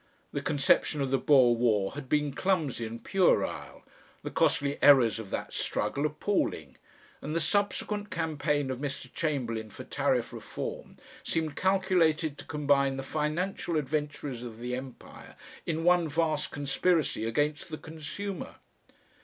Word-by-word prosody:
The - - -2
conception 145 +1 +2
of 135 -2 -1
the 135 - +3
Boer 130 -5 +5
War 110 -5 +2
had 140 -2 -8
been 150 -2 +1
clumsy 155 -11 0
and 115 +1 -8
puerile, 190 -2 +1 0.4
the - - -4
costly 140 0 +1
errors 130 -6 +6
of 110 -3 -7
that - - -4
struggle 145 +2 0
appalling, 150 - -2 0.4
and 155 - -4
the - - +2
subsequent 205 +4 0
campaign 150 -4 -1
of 130 - -4
Mr. 140 -2 -5
Chamberlain 120 -8 -2
for - - -9
Tariff - - 0
Reform - - -6 0.3
seemed 160 -3 -1
calculated 175 -5 +2
to - - -9
combine 140 -2 +2
the 135 - -4
financial 160 +4 -1
adventurers 145 -3 -2
of 120 -3 -8
the 125 +1 -4
Empire 130 -1 -10 0.3
in 165 0 -1
one 175 -1 +4
vast 155 0 0
conspiracy 145 0 +1
against 145 +8 -1
the 155 - -5
consumer. 160 +5 -6
150 Hz, 140 wpm, -29 LUFS, 130-165 Hz, 0.4 s, errors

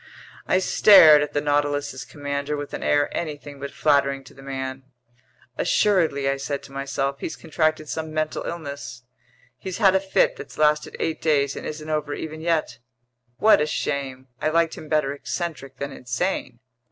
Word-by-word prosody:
I - - +3
stared 185 -5 +7
at 145 - -3
the 145 - +1
Nautilus's 145 -2 -1
commander 145 0 -4
with 145 0 -6
an - - -4
air 145 0 +1
anything 145 -3 -5
but 140 +1 -5
flattering 140 -2 +1
to - - -15
the 135 - -15
man. 135 -1 -5 0.8
"Assuredly," 165 -9 +2
I 135 0 +1
said 140 +1 -4
to - - -13
myself, 140 0 -2
"he's - - -4
contracted 155 -1 -1
some 160 +1 -4
mental 155 0 -2
illness. 140 -7 -6 0.6
He's 190 -2 -5
had 195 -4 +5
a 190 - +4
fit 195 0 +1
that's - - -10
lasted 150 0 +2
eight 160 - -2
days 140 -3 +2
and - - -6
isn't 155 0 -6
over 150 -2 -2
even 155 0 -6
yet. 160 -7 -1 0.6
What 220 -7 +5
a 150 - +1
shame! 135 -3 -3
I 155 - +1
liked 165 0 +2
him 155 - -10
better 150 -3 +1
eccentric 145 -1 -5
than 140 0 -4
insane!" 125 +1 -3
145 Hz, 170 wpm, -24 LUFS, 140-155 Hz, 0.8 s, stared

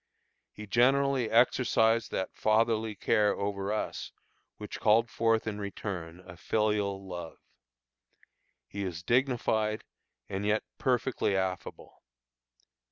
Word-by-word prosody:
He 105 - -9
generally 130 +2 +3
exercised 115 -1 +3
that 95 - -3
fatherly 110 0 +1
care 105 +1 +2
over 100 0 -2
us 110 - -3 0.5
which 105 - -7
called 110 +1 +3
forth 115 -1 +1
in 105 -2 -4
return 90 -4 -6
a 90 -1 -13
filial 105 -2 0
love. 85 -3 -7 1.3
He 100 - -5
is 85 -3 -5
dignified, 110 -2 +1 0.4
and 95 +1 -4
yet 105 +1 +1 0.2
perfectly 125 -5 +1
affable. 95 -1 -4
105 Hz, 105 wpm, -30 LUFS, 100-115 Hz, 1.3 s, generally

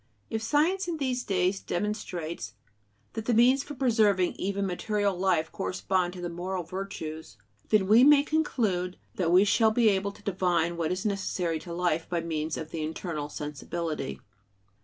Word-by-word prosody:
If 220 - -1
science 320 - +1
in 340 -2 -2
these 255 -4 -1
days 185 0 +1
demonstrates 175 - -4 0.6
that 225 -1 -4
the 240 - +2
means 250 +4 +5
for 290 +1 -8
preserving 215 -8 +3
even 200 +1 -2
material 200 +2 0
life 175 -3 +1
correspond 175 - -1
to 180 - -8
the 175 - -2
moral 180 +2 -4
"virtues," 160 - -6 0.3
we 215 +3 +6
may 285 0 +7
conclude 215 - 0 0.2
that 170 -3 +1
we 185 +2 +7
shall 220 +2 +4
be 220 0 +4
able 200 0 0
to - - -18
divine 175 -3 +1
what 165 -2 -1
is 185 +3 -3
necessary 185 -5 -1
to 170 - -9
life 170 -2 0
by 170 -1 0
means 160 -1 -2
of 160 -1 -6
the 165 - -4
internal 155 -1 -4
sensibility. 150 - -4
185 Hz, 160 wpm, -28 LUFS, 170-215 Hz, 0.6 s, may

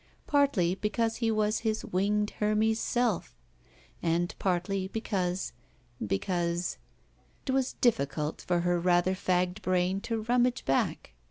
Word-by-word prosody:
Partly 275 -12 +3
because 225 +3 -1
he 230 -1 0
was 215 0 +1
his 220 -1 -1
winged 210 +3 +1
Hermes 215 +1 +2
self, 240 -7 0 0.6
and 170 +1 0
partly 190 +1 0
because 190 - -2 0.3
— 120 -1 -12
^because 170 - -1 0.3
— - - -35
^it 265 - 0
was 265 -1 +1
difficult 150 - 0
for 175 -1 0
her 175 0 +1
rather 175 +1 +3
fagged 180 +1 0
brain 185 +1 +1
to 225 0 -2
rummage 245 +2 +2
back. 135 - 0
190 Hz, 135 wpm, -29 LUFS, 175-220 Hz, 0.6 s, Partly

